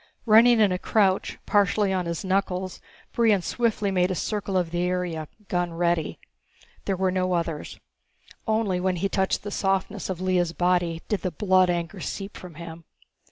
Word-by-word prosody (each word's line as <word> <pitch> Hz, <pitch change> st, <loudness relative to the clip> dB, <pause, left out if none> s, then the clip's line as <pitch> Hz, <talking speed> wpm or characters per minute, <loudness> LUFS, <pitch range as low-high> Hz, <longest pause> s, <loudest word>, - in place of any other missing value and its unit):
Running 230 Hz, +1 st, +6 dB
in 210 Hz, -3 st, +4 dB
a 180 Hz, -, -1 dB
crouch, 195 Hz, -1 st, +1 dB
partially 205 Hz, 0 st, +2 dB
on 180 Hz, -2 st, -1 dB
his 170 Hz, +3 st, -3 dB
knuckles, 185 Hz, -1 st, -1 dB, 0.3 s
Brion 220 Hz, -6 st, +3 dB
swiftly 215 Hz, -3 st, 0 dB
made 180 Hz, -1 st, +2 dB
a 185 Hz, -, -1 dB
circle 200 Hz, 0 st, -2 dB
of 175 Hz, -3 st, 0 dB
the 175 Hz, 0 st, -1 dB
area, 180 Hz, -3 st, -2 dB, 0.2 s
gun 175 Hz, -1 st, -1 dB
ready. 170 Hz, -1 st, 0 dB, 0.7 s
There 195 Hz, -, -1 dB
were 190 Hz, 0 st, +1 dB
no 185 Hz, 0 st, 0 dB
others. 165 Hz, -3 st, -3 dB, 0.7 s
Only 215 Hz, -4 st, +1 dB
when 185 Hz, 0 st, 0 dB
he 195 Hz, +3 st, -1 dB
touched 190 Hz, -1 st, 0 dB
the 205 Hz, -, -5 dB
softness 195 Hz, +1 st, -1 dB
of 185 Hz, -2 st, -3 dB
Lea's 180 Hz, -2 st, +1 dB
body 175 Hz, -2 st, +1 dB
did 210 Hz, -5 st, -1 dB
the 185 Hz, -, -1 dB
blood 185 Hz, +1 st, +3 dB
anger 175 Hz, +2 st, -2 dB
seep 195 Hz, +3 st, -5 dB
from 180 Hz, -4 st, -10 dB
him. 165 Hz, 0 st, -9 dB
185 Hz, 170 wpm, -25 LUFS, 175-195 Hz, 0.7 s, Running